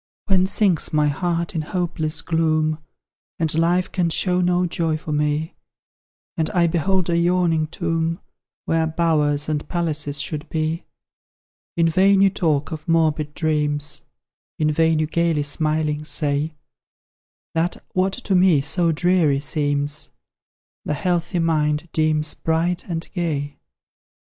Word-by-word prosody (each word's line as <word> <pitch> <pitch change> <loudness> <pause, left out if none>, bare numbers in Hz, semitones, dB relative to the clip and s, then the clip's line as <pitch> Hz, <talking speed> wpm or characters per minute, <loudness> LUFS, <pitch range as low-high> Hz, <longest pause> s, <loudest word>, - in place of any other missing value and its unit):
When 190 -2 +3
sinks 195 -4 +1
my 150 -1 +2
heart 170 +2 -1
in 160 - -1
hopeless 165 -1 -3
gloom, 155 -1 +1 0.6
And 160 -2 0
life 175 +3 +1
can 175 -2 +1
show 180 +2 +1
no 180 0 +2
joy 165 -2 -1
for 155 0 -7
me; 150 +1 0 0.8
And 160 -1 0
I 175 -1 +4
behold 175 +2 +1
a - - +2
yawning 170 -2 +2
tomb, 165 0 -2 0.5
Where 165 0 +1
bowers 155 -3 +1
and 150 -1 -2
palaces 150 -4 -1
should 150 +3 -3
be; 160 +1 -2 0.9
In 165 -1 +4
vain 190 +4 +4
you 195 - +5
talk 155 -5 0
of 155 +1 -7
morbid 155 -2 +1
dreams; 150 -2 -1 0.6
In 155 0 +2
vain 160 +1 +2
you 155 - +1
gaily 165 -1 +1
smiling 150 0 -1
say, 150 0 -1 1.0
That 165 +2 0 0.2
what 190 +1 +1
to 215 -4 -2
me 180 -5 +5
so 165 +4 +1
dreary 160 -3 +2
seems, 145 0 -2 0.7
The 150 - -2
healthy 175 0 -1
mind 155 -1 +1
deems 155 -1 +1
bright 165 +2 -1
and 165 0 -3
gay. 145 -6 -2
160 Hz, 135 wpm, -22 LUFS, 150-175 Hz, 1.0 s, you